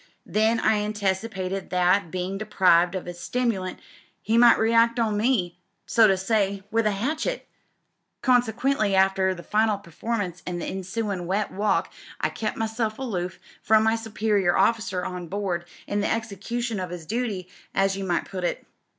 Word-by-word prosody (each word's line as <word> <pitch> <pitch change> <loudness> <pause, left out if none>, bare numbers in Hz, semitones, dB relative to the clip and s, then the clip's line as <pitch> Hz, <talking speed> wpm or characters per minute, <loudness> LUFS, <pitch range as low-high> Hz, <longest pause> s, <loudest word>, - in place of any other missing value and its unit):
Then 220 +2 +2
I 220 -1 +3
anticipated 195 -2 -2
that, 180 0 +2
bein' 185 +3 -3
deprived 180 -4 +3
of 185 - -4
'is 175 0 -7
stimulant, 195 -2 -1 0.5
he 220 - +1
might 235 0 +7
react 230 +1 +3
on 220 -2 +1
me, 205 -6 0 0.3
so 225 -2 +5
to 195 -2 +3
say, 200 0 0
with 225 0 +2
a - - +2
hatchet. 305 - -2 0.8
Con 250 -2 +5
sequently, 220 -2 0
after 190 0 +3
the 175 - -10
final 215 +1 +2
performance 195 0 -4
an' 180 -1 -2
the 175 - -4
ensuin' 190 -1 -3
wet 200 +3 -1
walk, 205 +2 0 0.3
I - - +1
kep' 215 -1 -3
myself 220 0 -2
aloof 185 -9 -3 0.2
from 220 0 +4
my 220 +1 +3
superior 210 -4 +1
officer 220 -5 +1
on 180 -1 -5
board 185 -2 -2 0.2
in 205 0 -1
the 205 - 0
execution 225 +1 -3
of 180 -1 -4
'is 175 -2 -7
duty 215 -3 -2 0.3
as 195 0 +2
you 195 - -4
might 175 -3 0
put 185 -2 -6
it. 175 - -2
205 Hz, 165 wpm, -25 LUFS, 185-225 Hz, 0.8 s, might